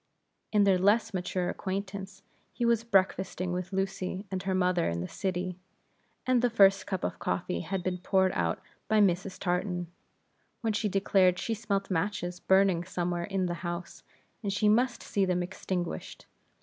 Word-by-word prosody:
In 210 -2 +4
their 195 -2 +4
less 215 +3 +3
mature 180 -1 -1
acquaintance, 195 +1 -4 0.3
he 240 - -2
was 235 -1 +3
breakfasting 190 -4 +1
with 180 +1 -4
Lucy 190 0 -2
and 190 -1 -2
her 190 0 -1
mother 180 -2 +2
in 85 - -2
the 90 - -3
city, 185 - -3 0.7
and 255 -2 +3
the 245 - +3
first 195 -4 +5
cup 190 -3 -3
of 90 - -2
coffee 90 -1 -2
had 190 - -3
been 180 -1 -2
poured 190 0 +2
out 85 -1 0 0.3
by 220 -1 +3
Mrs. 190 -1 +2
Tartan, 175 -1 -1 0.7
when 225 -2 0
she 210 0 0
declared 190 -2 +3
she 225 - -2
smelt 200 -3 -2
matches 180 0 -1
burning 190 -3 +3
somewhere 175 -1 -2
in 195 -1 -1
the 175 - -1
house, 175 0 -5 0.4
and 200 -3 -2
she 205 +2 +1
must 240 +4 +2
see 200 - 0
them 180 -1 +1
extinguished. 180 -1 -4
190 Hz, 165 wpm, -29 LUFS, 180-200 Hz, 0.7 s, first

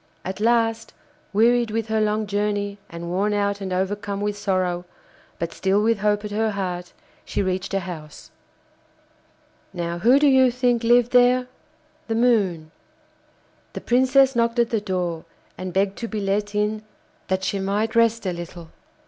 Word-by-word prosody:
At 190 +2 -5
last, 225 0 +1 0.4
wearied 235 +3 +3
with 225 0 -2
her 220 0 +1
long 215 0 0
journey 205 0 -2
and 170 0 -7
worn 200 +3 0
out 200 0 -1
and 190 -1 -4
overcome 200 +2 -2
with 205 0 -2
sorrow, 185 -3 -1 0.5
but 170 0 -4
still 195 +1 +1
with 225 -1 +2
hope 210 0 +1
at 210 - -6
her 220 +1 0
heart, 180 -3 -4 0.3
she - - -2
reached 185 +1 -2
a 195 - +1
house. 160 -5 -9 1.4
Now 170 -1 -3
who 245 +9 +5
do 290 - +3
you 265 -2 +5
think 245 -1 0
lived 240 +1 +4
there? 250 0 +4 0.6
The 225 - -1
Moon. 200 -10 +1 1.0
The - - -6
Princess 260 +2 +3
knocked 235 0 +1
at 235 -1 +2
the 225 -3 0
door, 180 -5 -2 0.3
and 185 0 -6
begged 195 +1 0
to 230 - -3
be 220 -1 -4
let 205 +1 -1
in 210 +1 0 0.5
that 190 0 -1
she 200 - -1
might 205 +4 -1
rest 230 -1 +3
a 185 - -1
little. 170 -1 -9
205 Hz, 165 wpm, -23 LUFS, 190-230 Hz, 1.4 s, who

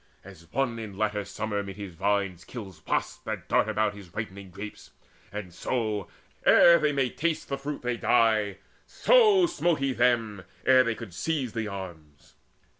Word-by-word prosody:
As 85 +1 -14
one 125 -3 -1
in 105 -4 -7
latter 105 -1 0
summer 105 0 -3
'mid 100 -1 -7
his 100 -3 -7
vines 100 0 -1
Kills 95 -9 -9
wasps - - -1
that - - -5
dart 110 - +2
about 110 -1 +1
his 100 -4 -12
ripening 100 -3 -6
grapes, 100 +4 -9 0.4
And 100 -3 -6
so, 110 -2 -2 0.4
ere 170 0 +7
they 150 - +2
may 135 -3 0
taste 165 0 -2
the 140 - -1
fruit, 145 0 -5
they 120 -1 -1
die; 110 -4 +2 0.3
So 430 -7 +5
smote 175 - +1
he 135 -1 0
them, 115 -5 +1 0.2
ere 130 -1 +6
they 115 -2 -1
could 110 -7 -9
seize 135 - -2
the 115 -2 -2
arms. 80 -8 -9
110 Hz, 170 wpm, -27 LUFS, 100-130 Hz, 0.4 s, ere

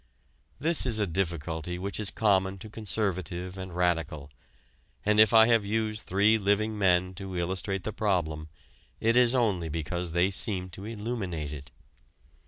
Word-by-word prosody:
This 160 -1 +3
is 115 -3 0
a 105 - +2
difficulty 85 -1 -3
which 100 +4 -4
is 105 -2 +1
common 95 -3 +1
to 105 +3 -10
conservative 95 -4 -2
and 95 -1 -7
radical, 85 -5 -1 0.7
and 105 +1 +3
if 110 -1 +7
I 110 -1 +8
have 115 -3 +4
used 110 +1 -2
three 105 +4 +3
living 105 +2 +1
men 90 -2 +2
to 95 -1 -7
illustrate 95 +2 -2
the 110 - -4
problem 80 -7 -1 0.5
it 115 +1 +2
is 125 0 +4
only 100 -9 +1
because 80 +2 -3
they 90 +3 +2
seem 95 -2 +1
to 95 +4 -9
illuminate 105 -9 -4
it. 70 -3 -9
95 Hz, 155 wpm, -28 LUFS, 90-110 Hz, 0.7 s, I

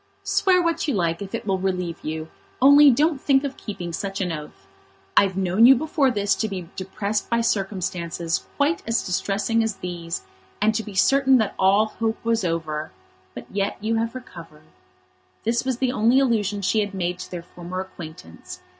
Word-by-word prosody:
"Swear 370 -2 +3
what 335 -1 0
you 285 - 0
like, 170 -2 0
if 195 -1 -5
it - - -5
will 190 -2 0
relieve 180 -3 -2
you, 155 +1 -4 0.3
only 285 +2 +8
don't 290 +3 +2
think 275 -1 +3
of 275 -1 -3
keeping 175 -5 -6
such 195 +3 -4
an 180 -3 -1
oath. 150 -11 -8 0.5
I've 195 -2 +4
known 190 +5 +5
you 270 - +8
before 295 0 +1
this 205 -4 +1
to 220 - 0
be 185 -4 -6
depressed 200 +2 -3
by 235 0 +2
circumstances 185 -5 -2
quite 295 +4 +1
as 230 0 +1
distressing 205 +4 0
as 225 -2 -1
these, 170 - -5 0.4
and 215 +2 +3
to 220 - -1
be 210 -3 -10
certain 270 +5 +4
that 220 -4 0
all 195 +3 +4
hope 220 +1 -2
was 230 -2 +1
over; 160 -3 -2 0.4
but - - -7
yet 200 0 -1
you 225 +2 0
have 230 +2 -2
recovered." 165 -11 -11 0.8
This 230 +2 0
was 260 -2 -1
the 255 0 0
only 245 +1 +3
allusion 210 -6 0
she 215 +4 +2
had 205 - +1
yet - - -6
made 180 0 -2
to - - -7
their 175 -2 -6
former 175 +1 -7
acquaintance. 160 - -9
200 Hz, 190 wpm, -23 LUFS, 180-235 Hz, 0.8 s, only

